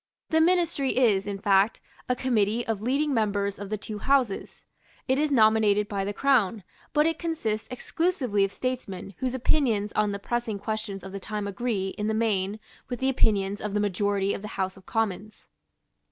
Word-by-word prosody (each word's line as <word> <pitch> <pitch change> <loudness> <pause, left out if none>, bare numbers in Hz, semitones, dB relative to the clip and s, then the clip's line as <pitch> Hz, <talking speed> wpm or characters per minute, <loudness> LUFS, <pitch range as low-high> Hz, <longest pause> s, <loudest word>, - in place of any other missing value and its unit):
The 320 0 +4
Ministry 335 -6 +2
is, 210 -6 +3
in 200 -1 -3
fact, 200 +1 +3 0.3
a 250 - +3
committee 235 -2 +1
of 220 -3 -2
leading 280 +5 +1
members 205 -3 0
of 200 -1 -6
the 215 - -1
two 210 0 -7
Houses. 255 -5 0 0.4
It 260 +1 +2
is 305 0 +2
nominated 215 -4 +4
by 200 -2 -2
the 205 - -2
Crown; 225 -4 +2 0.3
but 300 0 +3
it 325 -1 0
consists 230 -11 -2
exclusively 255 - 0
of 195 - 0
statesmen 205 -5 -4
whose 255 -1 -1
opinions 235 -6 +1
on 210 -1 +1
the 200 - -3
pressing 230 +1 -2
questions 215 -1 -4
of 190 - -8
the 195 - -5
time 210 +1 -4
agree, 200 -2 -2
in 210 - -1
the 220 - 0
main, 210 -2 0 0.3
with 245 -2 -4
the 265 - +1
opinions 205 -5 +1
of 210 -1 -3
the - - +2
majority 200 0 +1
of - - -5
the 210 - -6
House 190 -1 -1
of 190 -1 -17
Commons. 215 -1 -2
215 Hz, 185 wpm, -27 LUFS, 200-255 Hz, 0.4 s, The